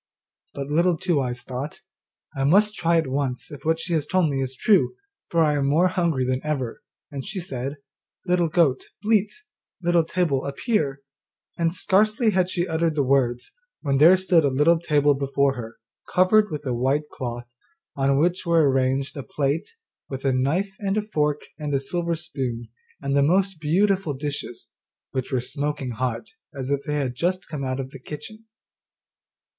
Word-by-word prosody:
But 140 - -3
Little 170 +2 +3
Two 165 -4 +1
eyes 120 -1 -3
thought, 130 +4 -6 0.5
'I 135 0 0
must 205 +8 +4
try 170 -4 +2
at 165 - +2
once 130 +1 -2
if 145 - -9
what 160 +1 +1
she 170 +1 -3
has 155 -3 0
told 180 -5 +2
me 135 -1 -1
is 130 0 -3
true, 210 - +3 0.3
for 165 -1 +3
I 150 -1 +3
am 140 -2 +1
more 165 +6 +4
hungry 170 -8 0
than 130 +1 -1
ever'; 140 -6 -3 0.3
and 140 -2 -5
she 195 +6 -4
said, 140 -4 -4 0.5
'Little 180 -2 +2
goat, 155 -6 +2 0.2
bleat, 215 -1 +2 0.5
Little 175 -1 +3
table 160 -5 0
appear,' 140 - -1 0.5
and 170 +1 0
scarcely 215 +5 +2
had 185 -2 +1
she 180 -1 -1
uttered 160 -1 0
the 145 - +2
words, 125 -2 +1 0.3
when 140 -2 +1
there 170 +5 +8
stood 180 -3 +3
a - - +3
little 150 +5 +3
table 145 -3 +3
before 140 0 +1
her 115 -3 -8 0.3
covered 210 +4 +4
with 150 -1 -5
a 125 - -1
white 135 +5 0
cloth, 120 -1 -6 0.4
on 135 0 +2
which 175 +5 +1
were 165 -4 +4
arranged 135 +1 0
a 140 - -4
plate, 145 - -2 0.3
with 135 0 -6
a 135 - +3
knife 160 +10 0
and 210 +1 -1
fork 150 -3 +1 0.2
and 145 -2 -2
a - - +2
silver 170 +4 -2
spoon, 130 -9 -4 0.3
and 140 0 0
the 140 - +4
most 185 +4 +2
beautiful 185 0 +1
dishes, 140 -4 -5 0.4
which 130 0 -3
were 130 - +1
smoking 145 +1 -3
hot, 115 0 -2 0.3
as 135 0 -4
if 140 -1 +1
they 150 - -1
had 135 -4 -1
just 180 +8 -1
come 150 -4 -5
out 130 0 -2
of 130 0 -5
the 135 - -10
kitchen. 215 - -9
150 Hz, 180 wpm, -24 LUFS, 135-175 Hz, 0.5 s, there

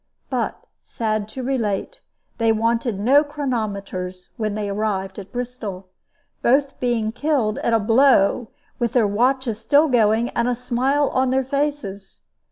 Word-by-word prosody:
But, - - -2 0.2
sad 215 -2 -2
to 255 +4 -7
relate, 245 - -2 0.4
they 225 -1 +3
wanted 230 -1 0
no 270 +8 +5
chronometers 205 -10 -4
when 215 -2 -2
they 210 -1 -2
arrived 200 -2 -2
at 195 -1 -10
Bristol, 230 -7 -5 0.5
both 275 +3 +2
being 235 -3 0
killed 250 -4 0
at 235 - 0
a 225 - +4
blow, 230 0 +4 0.3
with 235 -3 0
their 245 -4 +4
watches 235 +2 0
still 285 +7 +4
going, 230 -2 +3
and 235 - -1
a 250 - +1
smile 255 +4 +1
on 260 0 +1
their 265 0 +1
faces. 275 -9 -3
230 Hz, 145 wpm, -22 LUFS, 210-260 Hz, 0.5 s, no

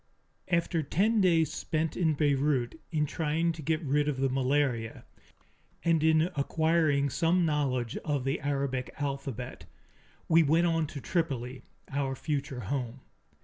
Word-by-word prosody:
After 170 -1 +1
ten 205 +9 +2
days 165 -4 +3
spent 160 0 -2
in 160 -4 +1
Beirut 140 -2 +1
in 150 -2 +1
trying 160 +3 0
to 160 -1 -8
get 155 +2 -1
rid 145 +1 +1
of 145 -3 -1
the 135 0 +1
malaria 130 -3 0 0.8
and 165 -2 +3
in 160 0 +4
acquiring 155 -1 +2
some 170 +4 +2
knowledge 135 -6 0
of 145 -4 -2
the 135 +4 -1
Arabic 140 -2 -2
alphabet, 135 -4 -4 0.6
we 165 0 +6
went 165 +3 +3
on 165 -2 +1
to 145 -1 -7
Tripoli, 130 - -2 0.3
our 135 -1 -1
future 135 -4 -3
home. 125 +3 -4
145 Hz, 140 wpm, -29 LUFS, 135-160 Hz, 0.8 s, we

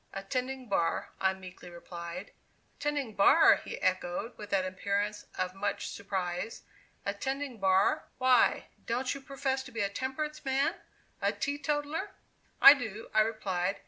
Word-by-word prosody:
"Attending 255 +6 -3
bar," 170 -5 0
I 190 0 +2
meekly 185 -1 -11
replied. 170 +1 -8 0.5
"Attending 285 -5 -1
bar!" 200 - +7
he - - -7
echoed, 185 +5 -1
with 210 -1 -10
an 190 -2 +2
appearance 200 +2 -2
of 185 0 -1
much 200 +1 -2
surprise; 190 +1 -4 0.4
"Attending 265 +5 -3
bar! 190 -1 +3
Why, 255 -1 +4 0.2
don't 250 +3 0
you 275 - -8
profess 270 -1 -2
to 260 - -11
be 230 -2 -3
a 200 - +1
temperance 265 +8 -4
man 270 0 +1 0.5
a - - +2
teetotaler?" 295 +6 -2 0.5
"I 275 - +12
do," 225 -6 -6
I - - +6
replied. 200 -4 -1
215 Hz, 140 wpm, -31 LUFS, 190-265 Hz, 0.5 s, I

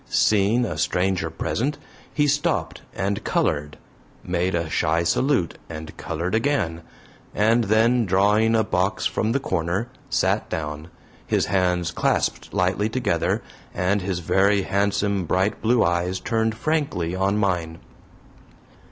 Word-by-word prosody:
Seeing 110 +4 +3
a 80 -7 -4
stranger 90 0 0
present, 130 - -2 0.3
he 145 - +1
stopped 145 0 0
and 100 +2 -2
colored, 75 +1 -1 0.5
made 90 0 -1
a 85 -1 -1
shy 80 +1 +1
salute 90 - +1
and 80 -1 -8
colored 85 +3 -4
again, 110 - 0 0.5
and 115 +3 +3
then, 115 +2 +3
drawing 105 +4 +3
a 110 - +3
box 95 +1 -1
from 110 - 0
the 135 - +1
corner, 95 0 -2 0.2
sat - - +1
down, 75 0 -4 0.4
his - - +1
hands 90 -2 +1
clasped - - -1
lightly 100 +2 +1
together 110 -8 0 0.3
and 95 +3 +1
his 90 -1 -2
very 100 +4 +2
handsome 100 -1 0
bright 95 +5 0
blue 120 +1 +3
eyes 85 +2 0
turned 110 +2 0
frankly 140 - -1
on 95 +2 +1
mine. 90 -5 -1
95 Hz, 130 wpm, -23 LUFS, 85-110 Hz, 0.5 s, Seeing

